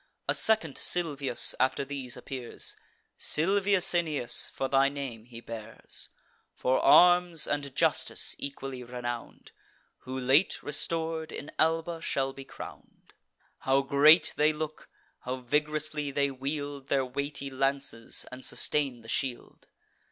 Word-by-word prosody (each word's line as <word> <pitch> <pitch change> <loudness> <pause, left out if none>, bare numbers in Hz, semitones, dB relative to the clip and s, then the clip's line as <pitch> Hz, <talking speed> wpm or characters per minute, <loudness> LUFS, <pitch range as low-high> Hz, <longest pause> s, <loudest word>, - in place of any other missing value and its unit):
A - - +2
second 215 -10 +2
Silvius 145 -8 +2
after 130 +1 +1
these 135 -2 -5
appears; 125 -1 -4 0.4
Silvius 195 +3 +3
Aeneas, 155 -8 0
for 135 - -3
thy 135 +1 +3
name 135 -6 -6
he 120 -1 -11
bears; 115 -1 -5 0.5
For 130 +1 +1
arms 175 -2 +6
and 140 -2 -3
justice - - +1
equally 135 -2 -5
renown'd, 120 -1 -6 0.5
Who, 130 +1 -6
late 135 +8 +2
restor'd, 160 +1 -2
in 145 - -7
Alba 165 +1 +1
shall 135 -4 -1
be 135 0 -10
crown'd. - - -12 0.5
How 135 +1 +2
great 150 +4 +6
they 150 +1 +4
look! 155 0 -6 0.3
how 125 +1 -4
vig'rously 150 +3 0
they 140 0 +1
wield 140 +1 -5
Their 135 -2 +1
weighty 140 +1 -3
lances, 135 -3 -1
and 130 0 -9
sustain 135 -5 0
the 115 - -15
shield! 125 +1 -3
140 Hz, 125 wpm, -29 LUFS, 130-155 Hz, 0.5 s, arms